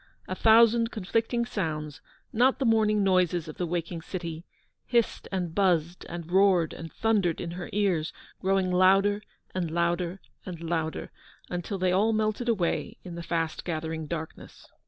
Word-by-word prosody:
A - - -3
thousand 230 +3 +5
conflicting 225 +3 -1
sounds 155 - -4 0.2
— - - -35
not 255 +4 +4
the 270 - -1
morning 215 -2 +3
noises 180 -3 +2
of 155 - -8
the 175 - -2
waking 170 0 -3
city 170 -1 -6 0.2
— - - -47
hissed 235 -2 +1
and 180 -4 -2
buzzed, 175 -3 +1
and 170 -1 -7
roared 185 -4 +4
and 165 -1 -8
thundered 205 -7 +1
in 170 - -4
her 175 0 -6
ears, 185 -6 +1 0.3
growing 190 -1 +1
louder 195 +3 +4 0.3
and 180 -3 -1
louder 170 +2 0 0.2
and 180 -3 -7
louder, 165 -1 -3 0.4
until 175 +3 -3
they 185 -1 +1
all 210 +5 +3
melted 215 +2 0
away 195 -7 0
in 180 - -8
the 170 - -6
fast 165 -1 -2
gathering 160 -1 -3
darkness. 160 0 -7
180 Hz, 160 wpm, -27 LUFS, 170-205 Hz, 0.4 s, thousand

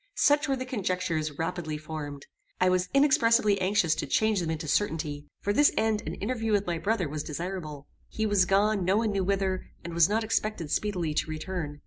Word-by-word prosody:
Such 290 +1 +4
were 270 - +2
the 255 0 -4
conjectures 180 - -2
rapidly 165 -2 -3
formed. 150 -2 -7 0.3
I 185 - +4
was 185 0 +1
inexpressibly 230 -7 +4
anxious 185 -4 +2
to - - -3
change 220 -2 +2
them 170 -2 -2
into 160 0 -3
certainty. 150 -5 -1
For 205 - 0
this 290 +6 +5
end 220 -1 +1
an - - -3
interview 225 +1 -2
with 205 -1 +2
my 170 -2 -2
brother 205 -4 0
was 150 +1 -4
desirable. 155 -2 -5 0.2
He 220 - -2
was 205 -3 +3
gone, 200 +1 +2
no 190 +3 +2
one 220 -1 +1
knew 195 -1 0
whither, 190 -1 -1 0.2
and 170 -1 -6
was 170 +1 +4
not 220 +2 +1
expected 215 -7 -2
speedily 180 -7 -1
to 155 - -1
return. 155 -2 -4
185 Hz, 195 wpm, -28 LUFS, 160-215 Hz, 0.3 s, this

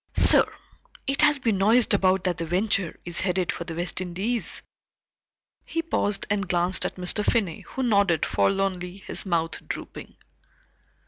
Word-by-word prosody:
"Sir, - - +6 0.5
it 275 0 +1
has 295 -1 +5
been 225 -7 0
noised 220 +4 +4
about 190 -1 +2
that 180 -2 -1
the 165 - -2
Venture 185 0 0
is 175 -1 -2
headed 185 -1 0
for 170 - -6
the 165 -2 -5
West 175 +1 -2
Indies." 195 +7 -2 1.0
He 330 - -3
paused 205 -11 -1
and 200 -2 -1
glanced 180 +1 +2
at - - -9
Mr. 180 +3 0
Finney 200 -8 0
who 265 - -6
nodded 200 -8 +2
forlornly, 190 -2 0
his 200 - -6
mouth 165 -2 -1
drooping. - - -7
190 Hz, 150 wpm, -25 LUFS, 175-210 Hz, 1.0 s, Sir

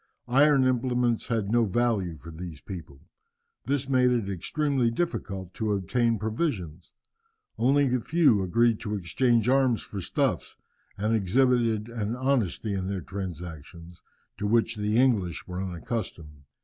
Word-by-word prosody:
Iron 140 0 +5
implements 125 -2 +1
had 110 -4 -1
no 120 0 +4
value 105 -5 0
for 80 +4 -11
these 80 -1 -8
people. 80 -7 -9 0.6
This 140 -1 -1
made 130 -2 +3
it 115 -5 0
extremely 135 - 0
difficult 100 - -3
to 110 -2 -1
obtain 115 +4 +1
provisions. 105 - -3 0.7
Only 135 +1 +3
a 125 - +2
few 145 - +3
agreed 115 +4 +2
to 105 -2 -3
exchange 115 +6 +1
arms 130 -3 +3
for 100 - -6
stuffs, - - -1 0.4
and 105 +3 +1
exhibited 115 +1 +2
an 115 -1 -3
honesty 120 -6 0
in 95 -1 -2
their 100 -2 -3
transactions 85 -2 -8 0.4
to 105 - -1
which 115 +1 +2
the 105 +1 0
English 110 -10 +1
were 90 0 -5
unaccustomed. 85 - -5
110 Hz, 135 wpm, -27 LUFS, 95-125 Hz, 0.7 s, Iron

